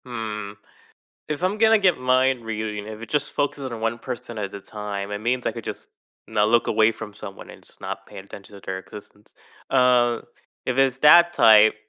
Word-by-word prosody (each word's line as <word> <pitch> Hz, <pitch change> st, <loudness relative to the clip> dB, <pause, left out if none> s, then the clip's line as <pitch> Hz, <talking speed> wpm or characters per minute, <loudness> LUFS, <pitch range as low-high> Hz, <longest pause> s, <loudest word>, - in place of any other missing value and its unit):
Mm, 105 Hz, -4 st, -5 dB, 0.7 s
if 150 Hz, +2 st, -4 dB
I'm 190 Hz, +3 st, 0 dB
gonna 225 Hz, 0 st, +5 dB
get 185 Hz, -4 st, +3 dB
mind 130 Hz, -1 st, +2 dB
reading, 105 Hz, -2 st, -4 dB
if 110 Hz, 0 st, -8 dB
it 115 Hz, -, -8 dB
just 145 Hz, -, -1 dB
focuses 140 Hz, -2 st, -2 dB
on 115 Hz, -1 st, -6 dB
one 115 Hz, +1 st, -1 dB
person 120 Hz, -2 st, -7 dB
at 100 Hz, -1 st, -4 dB
a 100 Hz, -, -7 dB
time, 105 Hz, -1 st, -6 dB
it 105 Hz, -, -3 dB
means 125 Hz, +3 st, -1 dB
I -, -, 0 dB
could 115 Hz, -2 st, -8 dB
just -, -, -7 dB, 0.4 s
not 105 Hz, -1 st, +2 dB
look 120 Hz, +1 st, +3 dB
away 110 Hz, +1 st, +3 dB
from 110 Hz, -1 st, -9 dB
someone 100 Hz, -1 st, -10 dB
and -, -, -15 dB
just -, -, -15 dB
not -, -, -6 dB
paying 95 Hz, -, -11 dB
attention 100 Hz, 0 st, -12 dB
to 100 Hz, -, -13 dB
their 95 Hz, 0 st, -4 dB
existence. 105 Hz, +2 st, -13 dB, 0.4 s
Uh, 120 Hz, -2 st, +3 dB, 0.5 s
if 130 Hz, -, -1 dB
it's 135 Hz, -1 st, +3 dB
that 170 Hz, +4 st, +7 dB
type, 110 Hz, -8 st, +6 dB
115 Hz, 200 wpm, -23 LUFS, 105-130 Hz, 0.7 s, that